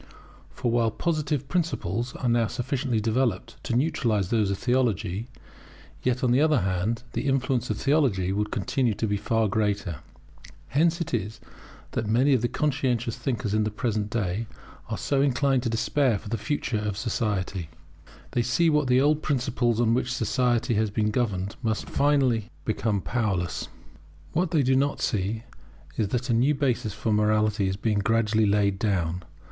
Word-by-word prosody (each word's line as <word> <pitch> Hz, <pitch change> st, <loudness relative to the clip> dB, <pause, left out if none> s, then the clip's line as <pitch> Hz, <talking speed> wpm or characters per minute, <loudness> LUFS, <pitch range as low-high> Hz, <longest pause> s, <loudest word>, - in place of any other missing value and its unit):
For 120 Hz, -, -2 dB
while 115 Hz, -1 st, +2 dB
Positive 150 Hz, +1 st, -1 dB
principles 120 Hz, -, -2 dB
are 125 Hz, -, -2 dB
now 115 Hz, -1 st, +3 dB
sufficiently 130 Hz, -1 st, -1 dB
developed 110 Hz, -2 st, -1 dB
to 120 Hz, -, -1 dB
neutralize 120 Hz, -, +1 dB
those 110 Hz, -4 st, +2 dB
of 100 Hz, -, -1 dB
Theology, 115 Hz, -5 st, 0 dB, 0.7 s
yet, 125 Hz, 0 st, 0 dB
on 125 Hz, -, +3 dB
the 130 Hz, +3 st, +4 dB
other 155 Hz, -6 st, +3 dB
hand, 95 Hz, +6 st, -1 dB
the -, -, -2 dB
influence 130 Hz, -2 st, 0 dB
of 110 Hz, -, -1 dB
theology 130 Hz, -, +2 dB
would 105 Hz, +1 st, -1 dB
continue 115 Hz, +2 st, 0 dB
to 115 Hz, -, -1 dB
be 105 Hz, -1 st, 0 dB
far 110 Hz, +2 st, +1 dB
greater. 100 Hz, -5 st, -1 dB, 0.7 s
Hence 165 Hz, +4 st, +2 dB
it 165 Hz, -, -4 dB
is 110 Hz, -1 st, -2 dB, 0.5 s
that 110 Hz, -, -2 dB
many 130 Hz, +6 st, +4 dB
conscientious 125 Hz, -2 st, 0 dB
thinkers 115 Hz, -6 st, -2 dB
in 110 Hz, 0 st, +2 dB
the 105 Hz, -, 0 dB
present 105 Hz, -1 st, -2 dB
day 105 Hz, -1 st, -2 dB, 0.4 s
are -, -, -2 dB
so 140 Hz, -1 st, 0 dB
inclined 135 Hz, -1 st, +2 dB
to 120 Hz, -, -1 dB
despair 120 Hz, +1 st, +1 dB
for 105 Hz, -, -9 dB
the 115 Hz, -, -1 dB
future 125 Hz, -3 st, -1 dB
of 105 Hz, -2 st, -3 dB
society. 100 Hz, -6 st, -2 dB, 0.6 s
They 120 Hz, -, +1 dB
see 145 Hz, +8 st, +2 dB
that 150 Hz, -2 st, +2 dB
the 125 Hz, 0 st, +4 dB
old 150 Hz, +2 st, +3 dB
principles 125 Hz, -5 st, 0 dB
on 115 Hz, -1 st, +3 dB
which 125 Hz, +1 st, 0 dB
society 120 Hz, 0 st, +1 dB
has 110 Hz, 0 st, +1 dB
been 105 Hz, +1 st, 0 dB
governed 105 Hz, -5 st, -1 dB
must 110 Hz, -1 st, -1 dB
finally 130 Hz, -6 st, +2 dB, 0.2 s
become 110 Hz, -2 st, 0 dB
powerless. 95 Hz, -, -1 dB, 0.7 s
What 180 Hz, +1 st, +1 dB
they 155 Hz, -4 st, +2 dB
do 130 Hz, +1 st, +3 dB
not 140 Hz, +2 st, +1 dB
see 110 Hz, +1 st, -1 dB, 0.5 s
is 110 Hz, -, 0 dB
that 120 Hz, +4 st, -1 dB
a -, -, +3 dB
new 130 Hz, +6 st, +3 dB
basis 125 Hz, -6 st, 0 dB
for 110 Hz, +1 st, -1 dB
morality 105 Hz, -1 st, +2 dB
is 95 Hz, 0 st, -2 dB
being 105 Hz, 0 st, 0 dB
gradually 110 Hz, +1 st, +2 dB
laid 100 Hz, -1 st, +2 dB
down. 90 Hz, -5 st, 0 dB
115 Hz, 165 wpm, -26 LUFS, 105-130 Hz, 0.7 s, the